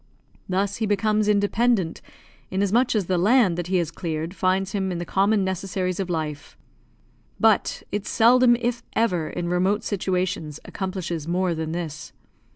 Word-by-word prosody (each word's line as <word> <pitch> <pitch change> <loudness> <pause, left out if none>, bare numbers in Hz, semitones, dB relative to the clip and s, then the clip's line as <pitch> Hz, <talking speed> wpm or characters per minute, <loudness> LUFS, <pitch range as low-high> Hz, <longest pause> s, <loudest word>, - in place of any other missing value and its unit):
Thus 195 +2 0
he 220 - -1
becomes 210 +1 +1
independent, 205 -2 +1 0.5
inasmuch 200 +6 +1
as 205 -4 +1
the 180 0 0
land 210 -1 +4
that 175 0 -4
he 185 0 +1
has 170 -2 -1
cleared 165 0 -4
finds 190 0 0
him 190 -2 -1
in 175 - -3
the 175 - -4
common 200 +2 +2
necessaries 185 0 -2
of 190 -2 -2
life; 155 -4 -4 0.8
but - - +2
it 205 0 -3
seldom, 240 +1 +5
if 240 0 -2
ever, 180 -8 +1
in 175 -1 -4
remote 185 +4 +1
situations, 180 -6 -2
accomplishes 185 -5 -4
more 180 +1 0
than 160 -1 -3
this. 160 -3 -5
190 Hz, 155 wpm, -24 LUFS, 175-205 Hz, 0.8 s, seldom